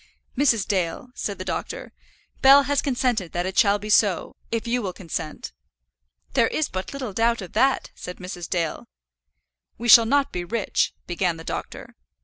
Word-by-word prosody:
"Mrs. 245 Hz, -7 st, +2 dB
Dale," 185 Hz, +4 st, -2 dB
said 200 Hz, -5 st, -4 dB
the 185 Hz, -, -6 dB
doctor, -, -, -5 dB, 0.5 s
"Bell 275 Hz, +1 st, +8 dB
has 280 Hz, 0 st, +1 dB
consented 245 Hz, -, -1 dB
that 175 Hz, +1 st, -1 dB
it 190 Hz, 0 st, -4 dB
shall 205 Hz, -1 st, +4 dB
be 210 Hz, +1 st, -5 dB
so, 205 Hz, -4 st, +2 dB, 0.2 s
if 230 Hz, 0 st, -2 dB
you 245 Hz, +1 st, 0 dB
will 190 Hz, -4 st, -4 dB
consent." 165 Hz, -4 st, -6 dB, 0.8 s
"There 235 Hz, -4 st, +4 dB
is 310 Hz, -, -1 dB
but 185 Hz, 0 st, -5 dB
little 260 Hz, -7 st, -5 dB
doubt 230 Hz, +3 st, +2 dB
of 180 Hz, -, -11 dB
that," 270 Hz, +1 st, +2 dB
said 180 Hz, -, -8 dB
Mrs. 180 Hz, -2 st, -7 dB
Dale. 170 Hz, -3 st, -2 dB, 0.9 s
"We 240 Hz, -, -4 dB
shall 230 Hz, -1 st, +9 dB
not 280 Hz, +2 st, +2 dB
be 180 Hz, -, -3 dB
rich 215 Hz, +3 st, -1 dB
" -, -, -45 dB
began 175 Hz, -1 st, 0 dB
the 165 Hz, -, -9 dB
doctor. -, -, -6 dB
210 Hz, 175 wpm, -24 LUFS, 180-245 Hz, 0.9 s, shall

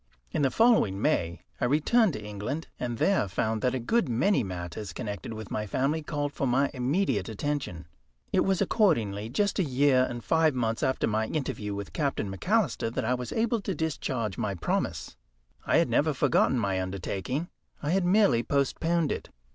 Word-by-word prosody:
In -, -, -1 dB
the 135 Hz, -, +3 dB
following 225 Hz, -, +3 dB
May 85 Hz, -4 st, 0 dB, 0.2 s
I -, -, +1 dB
returned 155 Hz, -, +3 dB
to 105 Hz, -3 st, -6 dB
England, 105 Hz, +10 st, -4 dB
and 120 Hz, -2 st, -3 dB
there 190 Hz, -, +2 dB
found 110 Hz, +3 st, -1 dB
that 125 Hz, 0 st, +1 dB
a -, -, -1 dB
good 220 Hz, -, +1 dB
many 130 Hz, -, +2 dB
matters 90 Hz, 0 st, -6 dB
connected 105 Hz, 0 st, -5 dB
with 110 Hz, -2 st, -7 dB
my 105 Hz, 0 st, -2 dB
family 140 Hz, +9 st, 0 dB
called 145 Hz, -1 st, -3 dB
for 135 Hz, -, -1 dB
my 135 Hz, +3 st, +2 dB
immediate 140 Hz, +6 st, 0 dB
attention. 110 Hz, -, -3 dB, 0.5 s
It -, -, +4 dB
was 195 Hz, -2 st, +2 dB
accordingly 110 Hz, -, +1 dB
just 200 Hz, -, 0 dB
a -, -, +4 dB
year 130 Hz, -2 st, +3 dB
and 120 Hz, -1 st, -6 dB
five 160 Hz, +4 st, +3 dB
months 115 Hz, -2 st, -1 dB
after 130 Hz, -, +1 dB
my 110 Hz, 0 st, 0 dB
interview 105 Hz, -8 st, -3 dB
with 100 Hz, -1 st, -6 dB
Captain 135 Hz, -10 st, -1 dB
McAlister 190 Hz, -, 0 dB
that 115 Hz, -, -2 dB
I 125 Hz, -, +2 dB
was 125 Hz, -1 st, -4 dB
able 230 Hz, 0 st, 0 dB
to 195 Hz, -2 st, -3 dB
discharge 130 Hz, -, -2 dB
my 105 Hz, -4 st, -1 dB
promise. 85 Hz, -, -2 dB, 0.5 s
I -, -, +4 dB
had -, -, +4 dB
never 150 Hz, 0 st, +2 dB
forgotten 130 Hz, -1 st, +3 dB
my 100 Hz, -4 st, 0 dB
undertaking 100 Hz, -, -3 dB, 0.3 s
I 145 Hz, -, 0 dB
had 190 Hz, +1 st, +2 dB
merely 180 Hz, -, +4 dB
postponed 150 Hz, +4 st, 0 dB
it. -, -, -4 dB
130 Hz, 180 wpm, -28 LUFS, 105-160 Hz, 0.5 s, It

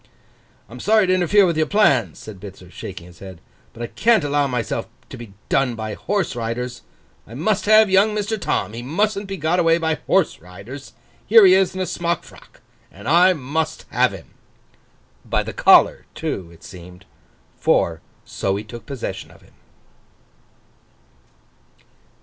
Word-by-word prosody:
'I'm -, -, -11 dB
sorry 215 Hz, -2 st, +3 dB
to 185 Hz, -, +2 dB
interfere 185 Hz, +3 st, +4 dB
with 170 Hz, -3 st, 0 dB
your 155 Hz, 0 st, +1 dB
plans,' 140 Hz, -, +2 dB
said 105 Hz, -3 st, -11 dB
Bitzer, 95 Hz, -2 st, -12 dB
shaking 95 Hz, -2 st, -9 dB
his 85 Hz, -1 st, -16 dB
head, 95 Hz, -3 st, -11 dB, 0.3 s
'but 120 Hz, -, -8 dB
I -, -, -1 dB
can't 225 Hz, -, +2 dB
allow 145 Hz, 0 st, +1 dB
myself 125 Hz, -3 st, -3 dB, 0.2 s
to -, -, -9 dB
be 115 Hz, -4 st, -11 dB
done 135 Hz, -3 st, +1 dB
by 110 Hz, -1 st, -5 dB
horse 195 Hz, -, -2 dB
riders. 120 Hz, +1 st, -4 dB, 0.5 s
I 115 Hz, -, -11 dB
must 190 Hz, -, -1 dB
have 215 Hz, +1 st, +6 dB
young 200 Hz, +3 st, +3 dB
Mr. 210 Hz, 0 st, -2 dB
Tom; 105 Hz, -, -2 dB
he 115 Hz, -, -6 dB
mustn't 200 Hz, -, -1 dB
be 195 Hz, 0 st, -5 dB
got 165 Hz, +3 st, 0 dB
away 165 Hz, -1 st, +3 dB
by 160 Hz, -2 st, -1 dB
horse -, -, +1 dB
riders; 100 Hz, -, -11 dB, 0.3 s
here 220 Hz, -1 st, +7 dB
he 185 Hz, -, +7 dB
is 190 Hz, -1 st, +2 dB
in 190 Hz, -, -3 dB
a -, -, 0 dB
smock 170 Hz, -1 st, -2 dB
frock, -, -, -18 dB, 0.3 s
and 100 Hz, +4 st, -12 dB
I 180 Hz, +4 st, +5 dB
must 155 Hz, +1 st, -3 dB
have -, -, +2 dB
him!' -, -, -12 dB, 0.9 s
By -, -, -1 dB
the -, -, -7 dB
collar, -, -, +4 dB
too, 90 Hz, -3 st, -4 dB
it 85 Hz, -, -18 dB
seemed. 90 Hz, +1 st, -13 dB, 0.5 s
For, 80 Hz, -1 st, +1 dB, 0.2 s
so 95 Hz, 0 st, -2 dB
he 100 Hz, -, -4 dB
took 110 Hz, +1 st, -11 dB
possession 135 Hz, -3 st, -6 dB
of -, -, -19 dB
him. -, -, -23 dB
145 Hz, 165 wpm, -21 LUFS, -, 0.9 s, here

